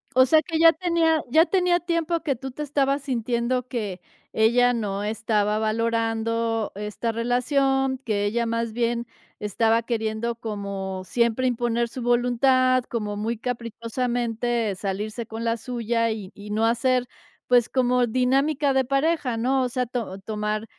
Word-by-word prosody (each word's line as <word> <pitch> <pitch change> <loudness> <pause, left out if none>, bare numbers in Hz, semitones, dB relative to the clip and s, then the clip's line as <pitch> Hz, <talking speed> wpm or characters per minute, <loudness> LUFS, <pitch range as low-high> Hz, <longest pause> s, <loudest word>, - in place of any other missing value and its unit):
O 260 - +7
sea, 310 +4 +5
que 320 +1 -3
ya 330 0 +7
tenía 325 -1 +1
ya 315 +6 +5
tenía 360 -2 +2
tiempo 335 -1 -1
que 295 -5 -1
tú 265 +2 -7
te 300 +4 -5
estabas 280 -1 0
sintiendo 245 -1 -1
que, 205 -8 -4 0.3
ella 245 +3 +4
no 205 -3 -2
estaba 210 -1 0
valorando 225 0 0
esta 210 +3 -3
relación, 265 +3 +1
que 215 -6 -1
ella 235 +3 0
más 230 0 -1
bien 235 +1 -1 0.3
estaba 225 +2 +1
queriendo 225 0 -2
como 200 -4 -5
siempre 235 +5 +1
imponer 235 -1 0
su 255 - -7
voluntad, 250 +2 +3
como 210 -3 -3
muy 225 +2 -2
caprichosamente 235 -1 -2
salirse 210 +4 -4
con 225 0 -6
la 230 0 +1
suya 230 -1 -1
y 205 -3 -6
y 205 +1 -11
no 220 +2 +1
hacer, 250 +2 +1 0.4
pues, 245 -2 +4
como 250 -1 +2
dinámica 270 +4 +1
de 265 0 +3
pareja, 275 -1 +1
¿no? 260 +3 +1
O 250 - -1
sea, 250 +1 -1
to 230 -5 -4
tomar 210 +1 -3
235 Hz, 150 wpm, -24 LUFS, 220-255 Hz, 0.4 s, O